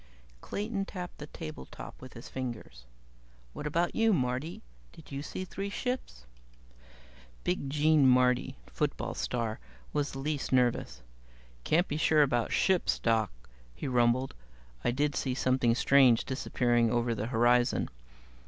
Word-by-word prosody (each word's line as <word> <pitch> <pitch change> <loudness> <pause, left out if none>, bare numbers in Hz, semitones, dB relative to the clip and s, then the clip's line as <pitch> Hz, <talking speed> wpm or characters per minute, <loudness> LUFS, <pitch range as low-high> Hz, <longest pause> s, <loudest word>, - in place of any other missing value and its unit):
Clayton 205 -1 -3
tapped 180 -3 -7
the 150 - -7
tabletop 155 0 -9
with 130 0 -10
his 115 - -10
fingers. 120 - -6 0.7
"What 150 - -5
about 170 +4 0
you, 225 -1 +3
Marty? 130 +1 -2 0.3
Did 160 - -15
you 140 0 -4
see 185 +5 -5
three 195 +2 -5
ships?" 200 - -4 1.2
Big 135 - -1
Gene 150 0 +4
Marty, 125 - +3
football - - -2
star, 115 -3 -2 0.3
was 145 0 -1
the - - -6
least 145 +1 -2
nervous. 125 -2 +1 0.6
"Can't 175 +4 +2
be 150 - -2
sure 155 -1 +4
about 120 -4 0
ships, 190 -2 +2
Doc," 110 -3 +1 0.4
he - - -5
rumbled. 125 +1 +2 0.5
"I - - +2
did 145 +3 0
see 130 -2 -1
something 130 -3 +2
strange 130 -3 +5
disappearing 120 -3 +1
over 120 0 +1
the 110 0 -3
horizon. 120 0 +3
130 Hz, 135 wpm, -30 LUFS, 120-155 Hz, 1.2 s, strange